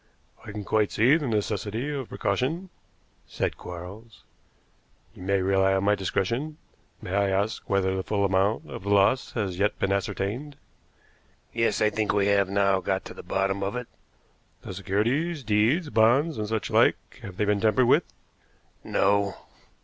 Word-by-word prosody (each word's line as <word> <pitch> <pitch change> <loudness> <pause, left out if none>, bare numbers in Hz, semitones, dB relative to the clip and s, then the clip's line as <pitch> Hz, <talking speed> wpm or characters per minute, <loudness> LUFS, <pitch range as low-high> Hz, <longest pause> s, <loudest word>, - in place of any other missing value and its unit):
"I 110 - -8
can 105 0 -6
quite 105 0 +1
see 125 +7 +4
the 155 -4 -1
necessity 110 +2 -2
of 135 -4 -5
precaution," 155 - -2 0.6
said - - -2
Quarles. 95 +6 -10 0.9
"You - - -14
may 95 0 +1
rely 95 0 +3
on 95 - 0
my 105 +1 +3
discretion. 115 +10 -2 0.5
May 90 - -5
I 100 0 +2
ask 100 +4 -1
whether 95 -1 +1
the 95 - -1
full 100 +1 0
amount 95 +3 +1
of - - -7
the 100 - -5
loss 100 +5 +3
has 95 -6 -3
yet 105 +1 +1
been 95 - 0
ascertained?" 100 +8 -2 1.0
"Yes, 115 -1 +1
I 105 - +3
think 110 0 0
we 100 -1 +2
have 100 -1 +3
now 100 -1 +2
got 95 +1 -2
to - - -8
the - - -9
bottom 95 0 -1
of 100 +4 -2
it." 125 0 -4 0.8
"The - - -7
securities 135 - -1
deeds, 115 - +2
bonds, 120 +7 +3
and 105 - -2
such 110 0 -2
like - - +2
have 95 -2 -9
they 105 - +1
been 105 -1 +1
tampered 115 +3 +3
with?" - - +3 0.7
"No." 100 0 +1
105 Hz, 165 wpm, -26 LUFS, 95-115 Hz, 1.0 s, see